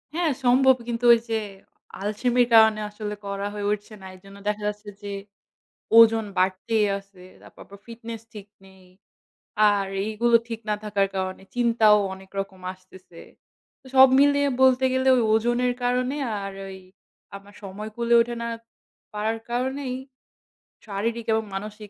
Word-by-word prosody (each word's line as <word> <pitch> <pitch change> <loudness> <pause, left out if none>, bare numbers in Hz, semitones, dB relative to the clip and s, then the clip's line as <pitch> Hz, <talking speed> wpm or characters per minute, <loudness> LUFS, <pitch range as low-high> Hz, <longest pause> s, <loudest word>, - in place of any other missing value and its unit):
হ্যাঁ, 340 -3 +1
সম্ভব। 260 +2 +5
কিন্তু 235 0 -3
ওই 235 - +3
যে 225 - 0 0.6
আলসেমির 240 +4 +1
কারণে 220 -1 +6
আসলে 210 0 -6
করা 200 0 -4
হয়ে 205 -1 -3
উঠছে 210 +1 -4
না। - - -11
এজন্য 195 +2 -15
দেখা 210 0 -2
যাচ্ছে 210 0 -5
যে 205 - -7 0.9
ওজন 225 -1 +6
বাড়তেই 195 +4 +1
আছে। 195 -2 -16 0.2
তারপর - - -16
আবার 200 0 -15
fitness 230 -1 -8
ঠিক 205 -2 -10 0.2
নেই। 190 -1 -19 0.9
আর 200 -1 0 0.2
এইগুলো 230 +2 +2
ঠিক 230 -1 -5
না - - +2
থাকার 200 -2 +1
কারণে 185 0 -4
চিন্তাও 230 -3 +4 0.2
অনেক 190 0 -15
রকম 195 -1 -8
আসতেছে। 185 -2 -17 0.6
তো 265 - -21
সব 265 0 +9
মিলিয়ে 285 0 +3
বলতে 260 0 +4
গেলে 260 0 +1
ওই 245 - +2
ওজনের 240 +2 +1
কারণে 250 +2 0 0.3
আর 195 0 -6 0.2
ওই 190 - -9 0.6
আমার 200 +1 -15
সময় 200 +2 -7
কূলে 235 0 -1
ওঠে 240 +1 -1
না 235 - -3 0.7
পারার 220 +2 -2
কারণেই 260 +2 -2 0.9
শারীরিক 225 +3 -3
এবং 220 - +1
মানসিক 210 +1 -7
220 Hz, 150 wpm, -24 LUFS, 200-240 Hz, 0.9 s, সব